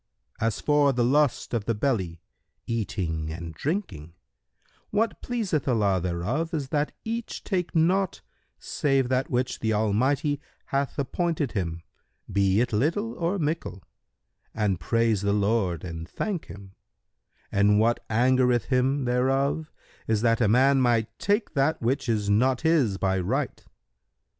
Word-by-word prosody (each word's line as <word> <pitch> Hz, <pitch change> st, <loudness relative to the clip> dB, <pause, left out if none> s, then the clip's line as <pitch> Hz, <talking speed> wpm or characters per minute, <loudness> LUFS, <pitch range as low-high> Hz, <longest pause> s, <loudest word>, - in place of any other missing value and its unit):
As 115 Hz, -1 st, 0 dB
for 145 Hz, -1 st, +3 dB
the 125 Hz, -2 st, +1 dB
lust 140 Hz, +2 st, +2 dB
of 115 Hz, -4 st, -1 dB
the 115 Hz, -, 0 dB
belly, 95 Hz, -9 st, -1 dB, 0.4 s
eating 85 Hz, -8 st, -2 dB
and 85 Hz, 0 st, -7 dB
drinking, 90 Hz, -, -4 dB, 0.8 s
what 220 Hz, +2 st, 0 dB
pleaseth 210 Hz, -, -2 dB
Allah 100 Hz, -7 st, +2 dB
thereof 105 Hz, -, -2 dB
is 140 Hz, -4 st, -3 dB
that 150 Hz, +1 st, 0 dB
each 230 Hz, +1 st, -4 dB
take 180 Hz, -4 st, -2 dB
naught 180 Hz, +4 st, +2 dB, 0.4 s
save 135 Hz, -3 st, 0 dB
that 130 Hz, +1 st, 0 dB
which 125 Hz, 0 st, -1 dB
the 110 Hz, -1 st, 0 dB
Almighty 130 Hz, -, +1 dB, 0.2 s
hath 140 Hz, 0 st, -2 dB
appointed 150 Hz, 0 st, -1 dB
him 85 Hz, -5 st, -3 dB, 0.5 s
be 100 Hz, +1 st, +3 dB
it 125 Hz, -1 st, -1 dB
little 170 Hz, -, 0 dB
or 175 Hz, +4 st, -1 dB
mickle, 150 Hz, -, -3 dB, 0.7 s
and 105 Hz, -5 st, 0 dB
praise 115 Hz, +3 st, +1 dB
the 100 Hz, 0 st, +1 dB
Lord 100 Hz, -5 st, +1 dB
and 85 Hz, -1 st, -6 dB
thank 200 Hz, -6 st, -3 dB
Him; 100 Hz, -1 st, -12 dB, 0.8 s
and 105 Hz, +1 st, +4 dB
what 115 Hz, +2 st, +2 dB
angereth 125 Hz, -1 st, +2 dB
Him 130 Hz, +1 st, +1 dB
thereof 135 Hz, +5 st, 0 dB, 0.4 s
is 110 Hz, 0 st, +1 dB
that 115 Hz, 0 st, +3 dB
a 110 Hz, -, +4 dB
man 130 Hz, +4 st, +4 dB, 0.4 s
take 205 Hz, +2 st, 0 dB
that 145 Hz, +2 st, +1 dB
which 130 Hz, +2 st, -1 dB
is 105 Hz, -3 st, 0 dB
not 125 Hz, +5 st, +2 dB
his 150 Hz, -12 st, +2 dB
by 95 Hz, -1 st, 0 dB
right. 130 Hz, +10 st, -2 dB
125 Hz, 140 wpm, -26 LUFS, 100-145 Hz, 0.8 s, and